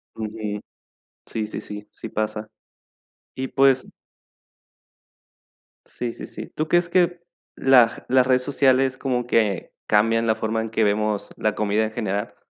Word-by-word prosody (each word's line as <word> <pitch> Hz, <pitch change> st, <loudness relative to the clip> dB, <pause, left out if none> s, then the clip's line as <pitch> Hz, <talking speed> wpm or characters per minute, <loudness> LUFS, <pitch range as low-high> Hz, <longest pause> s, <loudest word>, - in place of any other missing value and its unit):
Ujú. 105 Hz, -1 st, -4 dB, 0.6 s
Sí, 110 Hz, -1 st, -3 dB
sí, -, -, -5 dB
sí, 105 Hz, 0 st, -8 dB
sí -, -, -8 dB
pasa. 110 Hz, 0 st, -3 dB, 0.9 s
Y 130 Hz, 0 st, -3 dB
pues 135 Hz, -1 st, +3 dB, 2.0 s
Sí, 120 Hz, -1 st, -5 dB
sí, -, -, -8 dB
sí. -, -, -8 dB
¿Tú 155 Hz, -, -3 dB
crees 175 Hz, 0 st, +3 dB
que 175 Hz, -1 st, +2 dB, 0.3 s
lag 125 Hz, -3 st, +4 dB
las 130 Hz, 0 st, +4 dB
redes 130 Hz, -1 st, +4 dB
sociales 130 Hz, -1 st, +2 dB
como 125 Hz, -3 st, -1 dB
que 105 Hz, -6 st, +1 dB
cambian 115 Hz, +2 st, +3 dB
la 110 Hz, -, +3 dB
forma 110 Hz, 0 st, -1 dB
en 110 Hz, -, -4 dB
que 110 Hz, 0 st, +1 dB
vemos 105 Hz, 0 st, 0 dB
la 110 Hz, -2 st, -1 dB
comida 105 Hz, +1 st, +1 dB
en 110 Hz, -, -2 dB
general? 105 Hz, -3 st, -3 dB
115 Hz, 145 wpm, -23 LUFS, 105-130 Hz, 2.0 s, lag